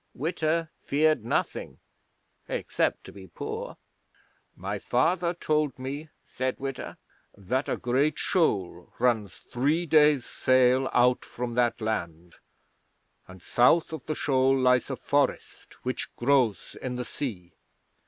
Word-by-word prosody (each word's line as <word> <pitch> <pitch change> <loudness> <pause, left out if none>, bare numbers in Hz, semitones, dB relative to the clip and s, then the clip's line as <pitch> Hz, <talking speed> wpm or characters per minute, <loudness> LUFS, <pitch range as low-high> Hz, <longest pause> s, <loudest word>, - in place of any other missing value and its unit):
Witta 160 +2 -1
feared 155 -2 +2
nothing 115 - -2 0.7
except - - -1
to - - -11
be 95 -2 -12
poor. 85 - -6 0.8
'"My 100 +3 -4
father 170 - +1
told 150 -5 0
me," 140 +4 -6
said 130 0 -3
Witta, 135 -1 -5 0.4
"that 125 +8 -2
a - - 0
great 135 +5 +1
Shoal 95 - 0
runs 110 -7 +1
three 150 +8 -1
days' 150 -4 +4
sail 130 +1 +3
out 125 0 +3
from 120 0 -5
that 120 0 +1
land, 85 -6 -4 0.9
and 95 -1 -14
south 155 +7 +3
of 155 -6 -6
the 155 - -1
shoal 135 -1 +2
lies 125 -1 +3
a 135 - -2
Forest 140 +1 -1
which 130 - -3
grows 125 -5 +1
in 125 -1 -3
the 125 0 -4
sea. 100 -13 -6
130 Hz, 125 wpm, -27 LUFS, 120-150 Hz, 0.9 s, days